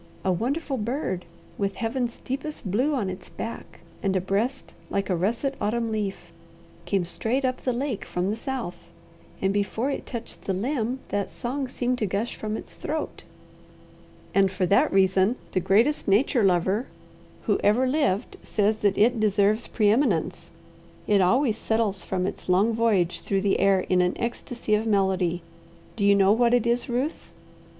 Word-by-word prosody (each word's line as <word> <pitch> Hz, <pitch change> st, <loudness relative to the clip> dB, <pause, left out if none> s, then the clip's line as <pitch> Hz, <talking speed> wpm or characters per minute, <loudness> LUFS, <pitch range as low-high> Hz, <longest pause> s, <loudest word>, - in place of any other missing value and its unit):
A 190 Hz, -, +3 dB
wonderful 270 Hz, -, -1 dB
bird, 215 Hz, -, -2 dB, 0.3 s
with 200 Hz, -1 st, -1 dB
Heaven's 240 Hz, +1 st, -2 dB
deepest 270 Hz, -6 st, -4 dB
blue 265 Hz, +9 st, +2 dB
on 215 Hz, -7 st, -1 dB
its 185 Hz, -1 st, -7 dB
back 230 Hz, -6 st, -7 dB, 0.2 s
and 195 Hz, -1 st, 0 dB
a -, -, +3 dB
breast 200 Hz, +7 st, -2 dB, 0.2 s
like 195 Hz, -1 st, -1 dB
a -, -, +2 dB
russet 230 Hz, +10 st, 0 dB
autumn 230 Hz, +2 st, 0 dB
leaf, 195 Hz, -5 st, -4 dB, 0.5 s
came 185 Hz, 0 st, 0 dB
straight 240 Hz, +9 st, -1 dB
up 255 Hz, 0 st, 0 dB
the 255 Hz, -, 0 dB
lake 250 Hz, -2 st, -2 dB
from 180 Hz, +3 st, -2 dB
the -, -, -1 dB
south, 235 Hz, -6 st, -5 dB, 0.5 s
and 195 Hz, 0 st, +2 dB
before 205 Hz, +6 st, 0 dB
it -, -, -5 dB
touched 235 Hz, -2 st, -7 dB
the 195 Hz, -, 0 dB
limb 245 Hz, +4 st, -1 dB
that 200 Hz, -1 st, -1 dB
song 265 Hz, +3 st, -3 dB
seemed 250 Hz, 0 st, -1 dB
to 215 Hz, -, 0 dB
gush 200 Hz, +5 st, -2 dB
from 215 Hz, 0 st, -3 dB
its -, -, -10 dB
throat." 310 Hz, +1 st, -4 dB, 1.1 s
"And 195 Hz, -1 st, +4 dB
for 190 Hz, -1 st, 0 dB
that 250 Hz, +11 st, +3 dB
reason, 190 Hz, +3 st, +3 dB, 0.2 s
the -, -, +1 dB
greatest 210 Hz, -, +2 dB
nature 220 Hz, +4 st, +3 dB
lover 190 Hz, +5 st, +2 dB, 0.6 s
who -, -, +1 dB
ever 225 Hz, +6 st, +4 dB
lived 255 Hz, -6 st, 0 dB
says 215 Hz, 0 st, +1 dB
that 205 Hz, -2 st, +1 dB
it 230 Hz, +3 st, +4 dB
'deserves 210 Hz, +1 st, +2 dB
preeminence.' 215 Hz, -, +1 dB, 0.6 s
It 205 Hz, -2 st, +4 dB
always 230 Hz, +4 st, +2 dB
settles 220 Hz, -4 st, 0 dB
from 185 Hz, -1 st, -1 dB
its 195 Hz, -1 st, -5 dB
long 200 Hz, +5 st, +4 dB
voyage 210 Hz, -6 st, +1 dB
through 195 Hz, -1 st, 0 dB
the 195 Hz, 0 st, +1 dB
air 195 Hz, -1 st, +4 dB
in 180 Hz, 0 st, +2 dB
an 180 Hz, 0 st, 0 dB
ecstasy 235 Hz, -1 st, -3 dB
of 215 Hz, +2 st, +2 dB
melody. 190 Hz, -4 st, +1 dB, 0.5 s
Do 210 Hz, -, -2 dB
you 200 Hz, 0 st, +6 dB
know 195 Hz, 0 st, +5 dB
what 235 Hz, +2 st, +4 dB
it 240 Hz, -, +1 dB
is, 235 Hz, +1 st, 0 dB
Ruth?" 255 Hz, +6 st, -2 dB
215 Hz, 170 wpm, -25 LUFS, 195-245 Hz, 1.1 s, you